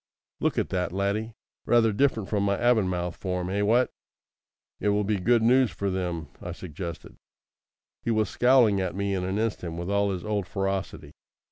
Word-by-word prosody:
"Look - - 0
at - - 0
that, 90 -2 -1
laddie. 100 +4 -2 0.3
Rather 115 -2 +4
different 115 -4 +1
from 105 -2 0
my 100 0 +1
Avonmouth 90 -7 +1
form, 90 -1 -3
eh? 100 +1 0
What?" 115 +5 +3 0.9
"It 105 - +1
will 105 0 +2
be 105 0 0
good 115 +4 +3
news 125 +1 +4
for 100 -1 -3
them," 85 -5 -3
I - - -5
suggested. 85 -1 -8 0.8
He - - -3
was 110 -2 +2
scowling 120 -5 +4
at 90 -2 -2
me 100 0 -1
in 95 -1 -1
an 95 +2 -2
instant 105 -7 -2
with 85 +3 -4
all 100 0 +2
his 95 -1 -4
old 105 -3 -1
ferocity. 95 -6 -3
100 Hz, 175 wpm, -26 LUFS, 90-110 Hz, 0.9 s, Rather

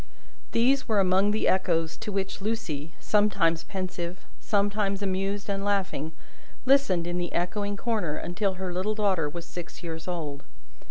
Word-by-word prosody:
These 265 +4 +3
were 215 -3 +3
among 190 +1 +4
the 215 +1 +1
echoes 165 -4 +2
to 220 -1 -5
which 195 0 -2
Lucie, 170 -8 -3
sometimes 185 -6 +3
pensive, 185 -2 -4
sometimes 200 -1 +1
amused 195 +1 -1
and 195 -1 -1
laughing, 195 -7 0 0.5
listened 255 -11 +4
in 175 0 -1
the 175 -1 -2
echoing 200 +3 -1
corner, 205 -9 0
until 190 +4 -1
her 185 -1 -3
little 195 +4 0
daughter 190 -8 +2
was 170 +3 -6
six 175 +1 -8
years 165 -1 -5
old. 155 -6 -3
190 Hz, 150 wpm, -28 LUFS, 175-205 Hz, 0.5 s, among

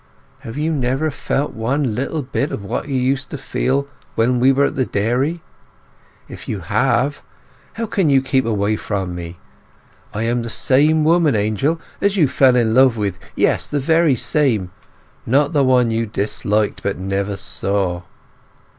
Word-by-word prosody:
Have 115 +4 -8
you 155 +2 0
never 135 +2 0
felt 140 +1 -2
one 125 +2 -1
little 140 +6 -2
bit 140 +3 -2
of 100 - -5
what 100 - -3
you 140 - -3
used 130 +1 0
to - - -5
feel 135 +1 -1 0.3
when 120 +2 +2
we 130 +2 +5
were 140 +1 +3
at - - -2
the 130 - +1
dairy? 130 +11 -1 0.8
If - - -11
you 100 - -3
have, 125 - 0 0.5
how 230 - -3
can 195 -6 0
you 135 -1 +5
keep 130 0 +1
away 105 -2 0
from 95 -5 -3
me? 85 0 -7 0.7
I 105 - -3
am 120 +1 0
the 115 - -5
same 150 +7 +2
woman, 160 -4 +3
Angel, 110 - 0 0.2
as 200 0 +1
you 155 -6 +4
fell 130 -1 +4
in 115 -3 +2
love 130 -1 +5
with; 100 -4 -2 0.2
yes, - - +1
the 145 - -1
very 160 0 +3
same!—not 130 - -1
the 145 -2 +3
one 125 -3 +3
you 115 0 -1
disliked 105 0 -1
but 100 - -2
never 95 +2 -2
saw. 95 -4 -1
125 Hz, 165 wpm, -19 LUFS, 105-145 Hz, 0.8 s, we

